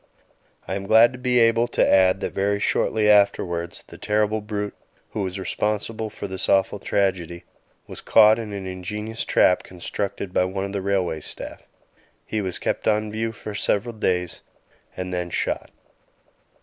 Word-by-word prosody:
I 95 Hz, -, -3 dB
am 100 Hz, 0 st, -4 dB
glad 115 Hz, +3 st, +6 dB
to 130 Hz, -, -9 dB
be 125 Hz, -1 st, +1 dB
able 115 Hz, 0 st, +4 dB
to -, -, +2 dB
add 95 Hz, 0 st, +4 dB
that -, -, -3 dB
very 100 Hz, +1 st, 0 dB
shortly 105 Hz, +1 st, +1 dB
afterwards 95 Hz, -5 st, +2 dB
the -, -, -13 dB
terrible 105 Hz, +1 st, +1 dB
brute 105 Hz, -1 st, -4 dB, 0.4 s
who 105 Hz, -, -3 dB
was 95 Hz, 0 st, -3 dB
responsible 105 Hz, +3 st, -2 dB
for 105 Hz, -1 st, -7 dB
this 95 Hz, -1 st, -3 dB
awful 95 Hz, +1 st, +2 dB
tragedy 90 Hz, -4 st, -1 dB, 0.4 s
was -, -, -9 dB
caught 110 Hz, 0 st, +6 dB
in 110 Hz, -2 st, -6 dB
an 100 Hz, -1 st, -5 dB
ingenious 105 Hz, +5 st, -5 dB
trap 90 Hz, -, +3 dB
constructed 95 Hz, +1 st, -5 dB
by 90 Hz, -, +3 dB
one 95 Hz, +1 st, -3 dB
of 100 Hz, -, -6 dB
the 100 Hz, -, -2 dB
railway 95 Hz, -4 st, 0 dB
staff. -, -, -7 dB, 0.6 s
He 110 Hz, -, -2 dB
was 95 Hz, -2 st, -2 dB
kept -, -, -2 dB
on 110 Hz, 0 st, +1 dB
view 110 Hz, +1 st, -2 dB
for 105 Hz, -1 st, -8 dB
several 105 Hz, +2 st, 0 dB
days, 90 Hz, -5 st, -1 dB, 0.6 s
and 90 Hz, 0 st, -4 dB
then 90 Hz, -1 st, -2 dB
shot. -, -, -2 dB
100 Hz, 165 wpm, -23 LUFS, 95-110 Hz, 0.6 s, glad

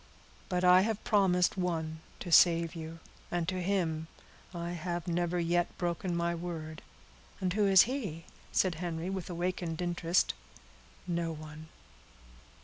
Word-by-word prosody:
"But 180 Hz, -1 st, 0 dB
I 180 Hz, +1 st, +7 dB
have 220 Hz, +1 st, -1 dB
promised 190 Hz, -4 st, +3 dB
one 160 Hz, -3 st, -2 dB, 0.2 s
to 175 Hz, -, -5 dB
save 170 Hz, 0 st, +6 dB
you, 165 Hz, -1 st, -7 dB, 0.3 s
and 175 Hz, -2 st, -1 dB
to 185 Hz, 0 st, -1 dB
him 170 Hz, -4 st, 0 dB, 0.4 s
I 170 Hz, -1 st, -4 dB
have 175 Hz, 0 st, -4 dB
never 175 Hz, 0 st, 0 dB
yet 175 Hz, +1 st, 0 dB
broken 175 Hz, 0 st, -2 dB
my 170 Hz, 0 st, 0 dB
word." 165 Hz, -2 st, -6 dB, 0.6 s
"And 185 Hz, -2 st, 0 dB
who 205 Hz, 0 st, +2 dB
is 190 Hz, -2 st, +8 dB
he?" 210 Hz, -, -4 dB, 0.3 s
said 185 Hz, -2 st, +2 dB
Henry, 170 Hz, +1 st, -3 dB
with 190 Hz, -2 st, -4 dB
awakened 175 Hz, -1 st, -2 dB
interest. 175 Hz, 0 st, +1 dB, 0.7 s
"No 170 Hz, -2 st, -1 dB
one." 155 Hz, 0 st, -9 dB
175 Hz, 140 wpm, -31 LUFS, 165-185 Hz, 0.7 s, is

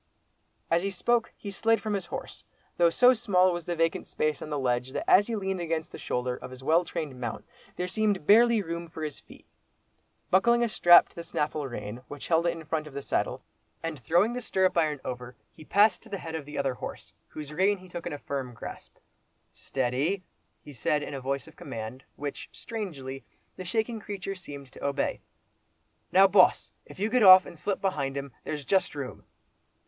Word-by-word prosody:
As 170 Hz, +1 st, +4 dB
he 195 Hz, -, -1 dB
spoke 230 Hz, +4 st, +1 dB
he 200 Hz, -, -7 dB
slid 225 Hz, +3 st, +2 dB
from 215 Hz, -1 st, -3 dB
his 190 Hz, -3 st, -2 dB
horse, -, -, -7 dB, 0.3 s
though 170 Hz, -1 st, +5 dB
so 250 Hz, +9 st, +6 dB
small 185 Hz, -6 st, +3 dB
was 175 Hz, -2 st, -5 dB
the 175 Hz, -, -1 dB
vacant 165 Hz, 0 st, 0 dB
space 155 Hz, -2 st, -1 dB
on -, -, -6 dB
the 150 Hz, -, -2 dB
ledge, 125 Hz, -1 st, -1 dB
that -, -, -3 dB
as 205 Hz, +2 st, +6 dB
he 230 Hz, -, -2 dB
leaned 190 Hz, -3 st, -2 dB
against 165 Hz, -1 st, -2 dB
the -, -, -9 dB
shoulder 125 Hz, 0 st, -2 dB
of -, -, -9 dB
his 130 Hz, 0 st, -11 dB
well 165 Hz, +5 st, +4 dB
trained 145 Hz, -6 st, -5 dB
mount, 120 Hz, -2 st, -4 dB, 0.3 s
there 180 Hz, -, -2 dB
seemed 205 Hz, -3 st, 0 dB
barely 230 Hz, +2 st, +6 dB
room 170 Hz, 0 st, -5 dB
for 160 Hz, -1 st, -7 dB
his 150 Hz, -2 st, -4 dB
feet. -, -, -17 dB, 0.9 s
Buckling 235 Hz, +6 st, +4 dB
a 235 Hz, -, +1 dB
strap 175 Hz, -4 st, +7 dB
to -, -, -25 dB
the 170 Hz, -, -5 dB
snaffle 150 Hz, -3 st, -2 dB
rein, 105 Hz, -2 st, -6 dB
which 145 Hz, -1 st, -8 dB
held 165 Hz, 0 st, +3 dB
it 170 Hz, -, +2 dB
in 165 Hz, -2 st, -9 dB
front 155 Hz, 0 st, -2 dB
of 145 Hz, -, -12 dB
the 140 Hz, -, -3 dB
saddle, -, -, -1 dB, 0.4 s
and 165 Hz, -3 st, -4 dB
throwing 175 Hz, -, +2 dB
the 250 Hz, -, -3 dB
stirrup 190 Hz, -4 st, +1 dB
iron 155 Hz, -4 st, +1 dB
over, 125 Hz, 0 st, -6 dB, 0.2 s
he 155 Hz, -, -13 dB
passed 200 Hz, +3 st, +4 dB
to -, -, -16 dB
the 200 Hz, -, -3 dB
head 165 Hz, -3 st, -7 dB
of 160 Hz, -3 st, -4 dB
the 150 Hz, -, -7 dB
other 135 Hz, -2 st, 0 dB
horse, -, -, -8 dB
whose 150 Hz, -1 st, -8 dB
rein 195 Hz, +5 st, +3 dB
he 185 Hz, 0 st, -14 dB
took 175 Hz, -1 st, -6 dB
in -, -, -4 dB
a -, -, -4 dB
firm 135 Hz, -4 st, -5 dB
grasp. -, -, -9 dB, 0.5 s
"Steady," 135 Hz, +9 st, -1 dB, 0.4 s
he 145 Hz, -, -11 dB
said 145 Hz, +5 st, 0 dB
in -, -, -6 dB
a 135 Hz, -, -5 dB
voice 135 Hz, 0 st, -2 dB
of -, -, -15 dB
command, 115 Hz, +4 st, -7 dB
which, 145 Hz, -1 st, -6 dB
strangely, 140 Hz, -, -6 dB, 0.3 s
the 185 Hz, -, -7 dB
shaking 225 Hz, +4 st, -1 dB
creature 200 Hz, -2 st, -5 dB
seemed 140 Hz, -8 st, -10 dB
to -, -, -12 dB
obey. 140 Hz, 0 st, -1 dB, 0.9 s
"Now, 190 Hz, +1 st, +7 dB
Boss! 190 Hz, -1 st, +4 dB, 0.2 s
you 205 Hz, +3 st, -1 dB
get 250 Hz, +2 st, +2 dB
off, 185 Hz, -2 st, +10 dB
and -, -, -10 dB
slip 195 Hz, +5 st, -3 dB
behind 140 Hz, -8 st, -1 dB
him—there's 140 Hz, +2 st, -6 dB
just 190 Hz, -2 st, +1 dB
room." 140 Hz, -3 st, -6 dB
165 Hz, 205 wpm, -28 LUFS, 140-195 Hz, 0.9 s, off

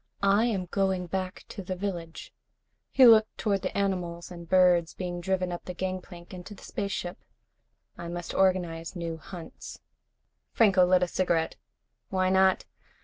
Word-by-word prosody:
"I 200 Hz, +3 st, +4 dB
am 200 Hz, -6 st, -1 dB
going 190 Hz, 0 st, 0 dB
back 185 Hz, +1 st, -4 dB
to -, -, -7 dB
the 185 Hz, 0 st, -4 dB
village." 175 Hz, -4 st, -5 dB, 0.6 s
He 265 Hz, -, +6 dB
looked 220 Hz, -2 st, +6 dB
toward 200 Hz, -3 st, 0 dB
the 185 Hz, -, -3 dB
animals 180 Hz, -3 st, -2 dB
and 170 Hz, -2 st, -10 dB
birds 180 Hz, -3 st, +4 dB
being 175 Hz, -1 st, -4 dB
driven 185 Hz, 0 st, -1 dB
up 175 Hz, -, -6 dB
the 180 Hz, -, -6 dB
gangplank 185 Hz, -1 st, -6 dB
into 185 Hz, +3 st, -9 dB
the -, -, -15 dB
spaceship. 195 Hz, -3 st, -4 dB, 0.8 s
"I 170 Hz, -, -6 dB
must 175 Hz, 0 st, -5 dB
organize 180 Hz, -3 st, 0 dB
new 170 Hz, -2 st, -4 dB
hunts." 170 Hz, +1 st, -10 dB, 0.7 s
Franco 195 Hz, -5 st, +5 dB
lit 180 Hz, 0 st, +4 dB
a -, -, +1 dB
cigarette. 170 Hz, -2 st, 0 dB, 0.5 s
"Why 185 Hz, -1 st, +1 dB
not? 190 Hz, 0 st, +3 dB
185 Hz, 150 wpm, -28 LUFS, 175-195 Hz, 0.8 s, He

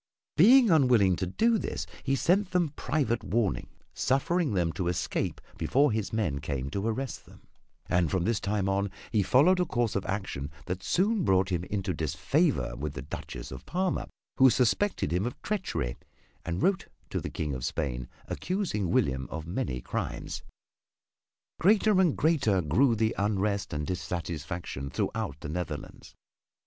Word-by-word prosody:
Being 235 Hz, -, +7 dB
unwilling 125 Hz, -, +5 dB
to 95 Hz, -, -2 dB
do 225 Hz, -, +2 dB
this -, -, -3 dB, 0.2 s
he 135 Hz, 0 st, +1 dB
sent 185 Hz, +7 st, +2 dB
them 180 Hz, -3 st, +1 dB
private 125 Hz, -4 st, 0 dB
warning, 110 Hz, -4 st, 0 dB, 0.3 s
suffering 140 Hz, -, +1 dB
them 85 Hz, -3 st, +1 dB
to 90 Hz, -, -2 dB
escape 90 Hz, -, -1 dB, 0.2 s
before 145 Hz, +1 st, +3 dB
his 110 Hz, -1 st, -2 dB
men 90 Hz, -11 st, 0 dB
came 70 Hz, -2 st, -3 dB
to 100 Hz, +5 st, -2 dB
arrest 125 Hz, +3 st, -3 dB
them; -, -, -16 dB, 0.4 s
and 90 Hz, -2 st, +2 dB
from 95 Hz, -2 st, 0 dB
this 110 Hz, +1 st, +1 dB
time 100 Hz, -1 st, -1 dB
on 100 Hz, +1 st, +1 dB, 0.2 s
he 110 Hz, -, +3 dB
followed 150 Hz, -, +4 dB
a 180 Hz, -, +3 dB
course 120 Hz, -7 st, 0 dB
of 100 Hz, -, 0 dB
action 95 Hz, -8 st, -3 dB, 0.2 s
that 90 Hz, +1 st, -3 dB
soon 200 Hz, -, +1 dB
brought 95 Hz, -3 st, +2 dB
him 90 Hz, 0 st, -1 dB
into 95 Hz, -2 st, -2 dB
disfavor 80 Hz, -, 0 dB
with 75 Hz, +3 st, -4 dB
the 65 Hz, -, -5 dB
Duchess 75 Hz, -, -7 dB
of 65 Hz, 0 st, -8 dB
Parma 185 Hz, +2 st, -1 dB, 0.3 s
who 130 Hz, 0 st, +8 dB
suspected 125 Hz, -, +1 dB
him 95 Hz, +6 st, +1 dB
of 125 Hz, -, -6 dB
treachery 190 Hz, -, -2 dB, 0.5 s
and 85 Hz, +3 st, -2 dB
wrote 195 Hz, -2 st, +2 dB, 0.2 s
to -, -, -1 dB
the -, -, -4 dB
King 75 Hz, -2 st, -3 dB
of 65 Hz, -2 st, -5 dB
Spain 65 Hz, -2 st, -2 dB, 0.2 s
accusing 180 Hz, -, -2 dB
William 65 Hz, -5 st, +1 dB
of 80 Hz, 0 st, -5 dB
many 85 Hz, -, -3 dB
crimes. -, -, -4 dB, 1.2 s
Greater 205 Hz, +1 st, +4 dB
and 175 Hz, -6 st, +2 dB
greater 135 Hz, -, +3 dB
grew 115 Hz, -, +3 dB
the 110 Hz, +1 st, +1 dB
unrest 100 Hz, 0 st, 0 dB
and 75 Hz, 0 st, -2 dB
dissatisfaction 85 Hz, -5 st, -4 dB
throughout 70 Hz, +1 st, -2 dB
the -, -, -5 dB
Netherlands. 90 Hz, +2 st, -6 dB
100 Hz, 160 wpm, -29 LUFS, -, 1.2 s, who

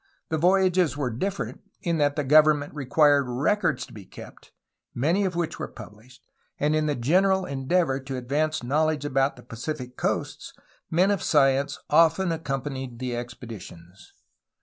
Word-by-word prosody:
The 160 Hz, -, 0 dB
voyages 180 Hz, -3 st, +3 dB
were 135 Hz, -4 st, -1 dB
different 195 Hz, -, -4 dB, 0.2 s
in 170 Hz, -3 st, 0 dB
that 145 Hz, -1 st, +2 dB
the 150 Hz, -, -1 dB
government 150 Hz, +1 st, +4 dB
required 145 Hz, 0 st, +3 dB
records 145 Hz, +4 st, 0 dB
to -, -, -17 dB
be 105 Hz, -, -10 dB
kept, -, -, -13 dB, 0.4 s
many 170 Hz, +11 st, +1 dB
of 180 Hz, -2 st, -2 dB
which 170 Hz, -2 st, -2 dB
were -, -, -5 dB
pubhshed, 115 Hz, +3 st, -14 dB, 0.4 s
and 150 Hz, +1 st, +1 dB
in 155 Hz, 0 st, +1 dB
the 145 Hz, -, 0 dB
general 185 Hz, +9 st, +2 dB
endeavor 140 Hz, +1 st, 0 dB
to 135 Hz, -1 st, -6 dB
advance 145 Hz, +4 st, -1 dB
knowledge 150 Hz, +3 st, 0 dB
about 135 Hz, -3 st, -1 dB
Pacific 125 Hz, +1 st, -6 dB
coasts, -, -, -3 dB, 0.4 s
men 180 Hz, +5 st, +3 dB
of 200 Hz, -, 0 dB
science 140 Hz, -2 st, +2 dB
often 165 Hz, +3 st, +3 dB
accompanying 135 Hz, -5 st, -4 dB
the 125 Hz, 0 st, -3 dB
expeditions. 110 Hz, -7 st, -10 dB
145 Hz, 150 wpm, -25 LUFS, 130-165 Hz, 0.4 s, government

